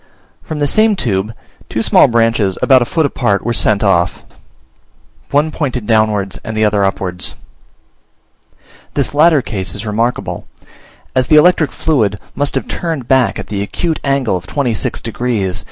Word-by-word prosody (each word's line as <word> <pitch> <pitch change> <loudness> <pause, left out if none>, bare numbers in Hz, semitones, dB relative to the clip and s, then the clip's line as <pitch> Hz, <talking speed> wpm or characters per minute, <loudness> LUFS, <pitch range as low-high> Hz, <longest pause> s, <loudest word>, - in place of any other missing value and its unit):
From 155 - -6
this 145 -1 +1
same 215 -1 +4
tube, 105 - -1 0.4
two - - -2
small - - +5
branches, 115 -4 +1
about 130 -2 +5
a - - +1
foot 160 +5 0
apart, 115 -8 0
were 120 - 0
sent 110 -2 +2
off; 90 -3 +1 1.1
one 150 +2 +1
pointed 130 -7 -3
downwards, 110 -3 +1
and 110 0 -5
the 110 - +3
other 105 -1 +2
upwards. 90 -2 -2 1.6
This 140 -5 0
latter 150 -2 +4
case 95 -6 -5
is 100 +2 -6
remarkable, 115 +3 -2 0.7
as 130 -1 +2
the 155 - +4
electric 155 0 +4
fluid 110 -10 0 0.2
must 145 0 -1
have - - -2
turned 160 -8 -4
back 130 -3 +2
at - - -6
the 100 -2 -4
acute 160 +10 -2
angle 135 -7 0
of 90 0 -6
26 125 -5 -1
degs. 110 -5 -1
115 Hz, 155 wpm, -15 LUFS, 100-145 Hz, 1.6 s, small